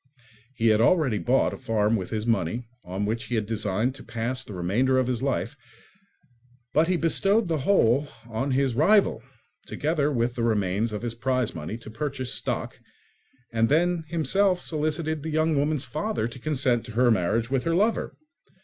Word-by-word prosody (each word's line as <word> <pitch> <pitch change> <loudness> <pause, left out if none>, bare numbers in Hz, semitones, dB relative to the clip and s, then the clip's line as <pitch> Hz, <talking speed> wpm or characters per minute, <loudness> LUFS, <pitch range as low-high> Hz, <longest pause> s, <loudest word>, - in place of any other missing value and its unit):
He 115 -2 +2
had 110 0 +4
already 130 - +3
bought 130 +2 +2
a - - -6
farm 115 -3 +1
with 95 -4 -3
his 110 -1 -3
money, 115 +1 0 0.2
on 95 +3 -3
which 115 +2 -2
he 120 - -3
had 110 -2 0
designed 110 +2 -1
to 135 - -12
pass 125 +3 -3
the 105 - -9
remainder 115 +10 +1
of 130 - +2
his 125 -2 -2
life; 135 +1 -1 1.2
but 155 +2 +3
he 180 0 +1
bestowed 195 +6 +3
the 160 -2 0
whole 140 - +3 0.2
on 115 +4 -2
his 135 -1 +1
rival, 160 - +3 0.5
together 150 -1 0
with 120 -2 0
the 120 - -4
remains 105 0 0
of 105 +1 -5
his 120 -1 -3
prize 125 0 -1
money 80 +7 -5
to 115 -2 -11
purchase 135 0 -3
stock, - - -3 0.7
and 115 0 +2
then 170 +3 +2
himself 180 +3 +2
solicited 155 -1 -2
the 160 - -5
young 155 0 +1
woman's 145 0 0
father 155 - -2
to 120 +2 -10
consent 130 -4 +1
to 115 - -9
her 120 +1 +4
marriage 110 +4 0
with 135 -2 +1
her 165 0 +1
lover. 215 +5 +1
130 Hz, 180 wpm, -26 LUFS, 115-155 Hz, 1.2 s, had